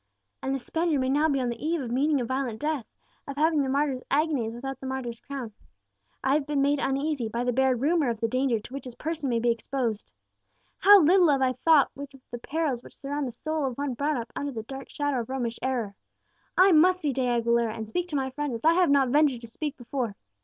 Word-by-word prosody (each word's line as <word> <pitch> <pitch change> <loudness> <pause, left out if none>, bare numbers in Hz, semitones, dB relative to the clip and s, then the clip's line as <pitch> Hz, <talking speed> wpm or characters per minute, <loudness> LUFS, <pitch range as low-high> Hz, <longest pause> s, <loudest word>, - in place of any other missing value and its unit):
"And 270 0 -1
the - - 0
Spaniard 320 +4 -1
may 260 0 0
now 295 +4 +3
be 275 -2 +1
on 250 -2 -1
the 235 +2 -6
eve 330 +2 0
of 250 -4 -5
meeting 285 +3 +2
a 245 - -1
violent 260 -3 -2
death 300 -6 -2 0.4
of 280 - -5
having 310 0 +3
the 270 - -1
martyr's 275 -1 0
agonies 280 -7 0
without 270 +2 -6
the 265 - -6
martyr's 250 -3 -4
crown! 260 -6 -7 0.7
I 265 - +2
have 295 -1 +1
been 295 -1 0
made 285 +1 +2
uneasy 275 -3 -1
by 235 +3 -2
the 245 0 0
bare 265 +1 +3
rumour 290 +2 +1
of 230 -2 -3
the 230 - +1
danger 255 -1 +1
to 240 - -12
which 275 - -6
his 250 -2 -8
person 310 -2 -3
may 235 - +1
be 235 +1 +2
exposed. 230 -1 -3 0.7
How 405 0 +8
little 350 +2 +5
have 275 -2 +3
I 255 -1 +2
thought 305 +1 +4
of 285 +1 -7 0.2
the 240 - -5
perils 285 -2 -2
which - - -15
surround 285 0 -3
the - - -5
soul 310 +5 -3
of 250 - -5
one 285 -2 -2
brought 285 +3 -1
up 230 -1 -6
under 285 0 -3
the 225 -4 -5
dark 270 +3 -8
shadow 290 -3 -1
of 230 - -5
Romish 245 -3 -3
error! 245 -6 -2 0.6
I 375 +2 +7
must 360 +3 +5
see 295 -4 0
De 255 0 0
Aguilera, 235 -1 +1
and 220 -1 -5
speak 355 +11 -2
to 315 - -5
my 265 -1 -1
friend 290 -2 -3
as 230 - -7
I 325 - +6
have 360 -1 +3
not 275 -2 +4
ventured 280 -3 +3
to 235 - -9
speak 290 +5 -5
before. 245 -3 -3
270 Hz, 245 wpm, -27 LUFS, 240-295 Hz, 0.7 s, How